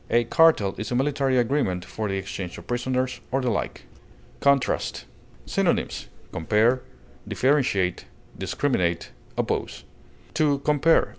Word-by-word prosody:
A 120 0 +4
cartel 120 - +4
is 110 - -3
a 125 - -1
military 135 0 +1
agreement 115 -8 +1
for 110 -2 -4
the 95 - -1
exchange 95 -2 -5
of - - -11
prisoners 130 +1 -1
or 135 - +2
the 125 -2 0
like. 100 - -3 0.6
CONTRAST. 140 -2 +1 0.4
Synonyms: - - 0 0.2
compare, 110 +9 +2 0.5
differentiate, 125 -10 +1 0.3
discriminate, 90 - -1 0.3
oppose. - - -2 0.5
To 150 -3 +3
compare 150 +2 +5
(L. - - -16
125 Hz, 125 wpm, -25 LUFS, 100-140 Hz, 0.6 s, compare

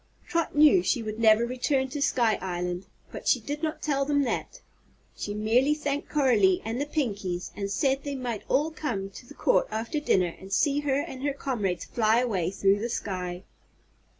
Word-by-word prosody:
Trot 335 -3 -1
knew 305 +5 +6
she 250 -8 0
would 215 0 -5
never 225 0 +5
return 265 +2 0
to 290 +1 -5
Sky 235 -5 +2
Island, 180 0 -3 0.2
but - - -8
she 255 - +4
did 290 +6 -5
not 315 -1 -3
tell 280 -2 +1
them 285 0 +2
that. 240 - -3 0.6
She 205 - -4
merely 240 +7 +3
thanked 290 -1 -3
Coralie 225 -11 +3
and 230 +4 -2
the 290 - -2
Pinkies 200 - -2
and 200 0 -3
said 270 +5 +1
they 285 -1 -4
might 245 -5 -3
all 295 +4 +2
come 225 -11 -3
to 245 - -12
the - - -13
Court - - +2
after 225 +8 -2
dinner 185 - +1
and 190 +1 -11
see 285 +7 +2
her 280 -2 +1
and 265 -2 -6
her 285 0 0
comrades 210 -11 -2
fly 220 -1 +2
away 205 -9 0
through 195 +1 +2
the 235 +3 -3
sky. 180 -5 -4
240 Hz, 190 wpm, -27 LUFS, 200-285 Hz, 0.6 s, knew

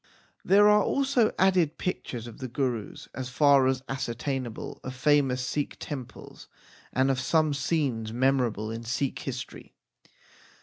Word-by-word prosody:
There 205 +2 +6
are 210 0 +6
also 265 -2 +2
added 185 -5 +3
pictures 125 -10 -4
of 120 -2 -10
the 130 - -4
Gurus 125 -3 -3
as 130 -1 -5
far 140 0 +4
as 130 0 0
ascertainable, 130 -1 -4
of 130 0 -6
famous 130 -2 +2
Sikh 145 +3 -2
temples, 135 -5 -8 0.4
and 130 +1 +2
of 130 - -1
some 155 +3 +2
scenes 140 -6 -1
memorable 120 -4 +1
in 115 +1 -5
Sikh 125 +4 -2
history. 130 -2 -7
135 Hz, 135 wpm, -27 LUFS, 125-150 Hz, 0.4 s, There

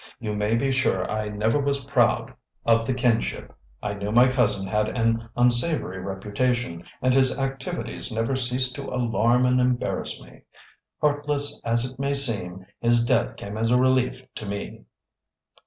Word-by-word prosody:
You 110 -4 -3
may 105 +2 0
be 135 +3 +1
sure 130 -8 +1
I 110 -1 -2
never 110 +6 0
was 140 -1 0
proud 125 -3 +1 0.3
of 115 0 +3
the 130 - +1
kinship. 120 -2 -1 0.3
I 105 - -2
knew 100 0 -4
my 120 +3 +6
cousin 120 -7 +1
had 105 +3 0
an 115 0 0
unsavory 120 - +2
reputation, 100 0 -2 0.2
and 130 0 +3
his 130 -1 +3
activities 135 0 -4
never 115 +4 -1
ceased 125 0 +1
to 140 - -6
alarm 120 0 +2
and 125 0 +3
embarrass 125 -1 0
me. - - -17 0.6
Heartless 145 -1 0
as 115 +1 +1
it 130 +1 -9
may 140 +1 0
seem, 95 -9 +1
his 120 0 +3
death 120 -1 +1
came 100 +1 -7
as 115 0 +1
a 125 - +4
relief 130 0 +1
to 110 - -7
me." 100 -10 -6
120 Hz, 160 wpm, -24 LUFS, 105-130 Hz, 0.6 s, my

